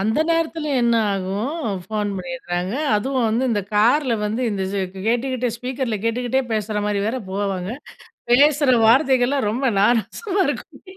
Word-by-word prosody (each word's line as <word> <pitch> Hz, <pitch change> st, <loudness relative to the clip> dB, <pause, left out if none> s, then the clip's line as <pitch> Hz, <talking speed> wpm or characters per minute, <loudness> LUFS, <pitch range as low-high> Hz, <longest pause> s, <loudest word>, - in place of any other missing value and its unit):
அந்த 220 Hz, +9 st, +1 dB
நேரத்துல 325 Hz, -2 st, -1 dB
என்ன 235 Hz, -1 st, +3 dB, 0.2 s
ஆகும் 200 Hz, -, -3 dB, 0.2 s
ஃபோன் 210 Hz, -1 st, -2 dB
பண்ணிறாங்க. 185 Hz, -5 st, -4 dB, 0.2 s
அதுவும் 255 Hz, +2 st, 0 dB
வந்து 235 Hz, +4 st, 0 dB
இந்த 210 Hz, -3 st, +1 dB
கார்ல 240 Hz, +4 st, +3 dB
வந்து 215 Hz, +4 st, -2 dB
இந்த 195 Hz, -2 st, -2 dB
இது 190 Hz, -1 st, -4 dB
கேட்டுக்கிட்டே 245 Hz, +1 st, 0 dB
ஸ்பீக்கர்ல 250 Hz, -2 st, -3 dB
கேட்டுக்கிட்டே 245 Hz, +3 st, 0 dB
பேசற 210 Hz, -1 st, -1 dB
மாரி 205 Hz, -1 st, 0 dB
வேற 245 Hz, +4 st, -1 dB
போவாங்க, 195 Hz, -1 st, -2 dB, 0.6 s
பேசுற 285 Hz, +1 st, +5 dB
வார்த்தைகள்லாம் 260 Hz, -1 st, +3 dB
ரொம்ப 260 Hz, +5 st, 0 dB
நாராசமா 360 Hz, -, +1 dB
இருக்கும். -, -, -6 dB
235 Hz, 135 wpm, -21 LUFS, 205-265 Hz, 0.6 s, பேசுற